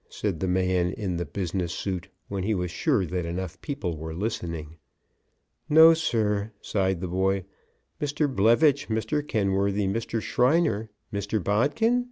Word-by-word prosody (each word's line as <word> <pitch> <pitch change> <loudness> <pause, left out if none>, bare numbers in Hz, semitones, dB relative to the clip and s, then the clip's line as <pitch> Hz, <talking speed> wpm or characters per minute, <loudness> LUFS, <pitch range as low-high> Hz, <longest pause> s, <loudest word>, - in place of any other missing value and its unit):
said 100 -7 -3
the 95 - -1
man 90 -1 +1
in 95 -5 -3
the 85 - -2
business 90 -2 -3
suit, 90 -1 -3 0.2
when 100 -1 -3
he 105 +3 0
was 90 -2 -2
sure 125 - +1
that 90 +1 -2
enough 90 +1 -5
people 90 - -3
were 80 +1 -6
listening. 85 -6 -4 0.9
"No, 160 +2 +9
sir," 110 -9 0
sighed 95 -3 -1
the 95 - -2
boy. 95 +2 0 0.6
"Mr. 145 +1 0
Blevitch, 135 +4 +3
Mr. 110 +7 0
Kenworthy, 100 -5 0
Mr. 115 +3 -1
Shriner, 125 -3 +2 0.2
Mr. 100 +2 -1
Bodkin?" 145 - +2
100 Hz, 145 wpm, -26 LUFS, 90-115 Hz, 0.9 s, No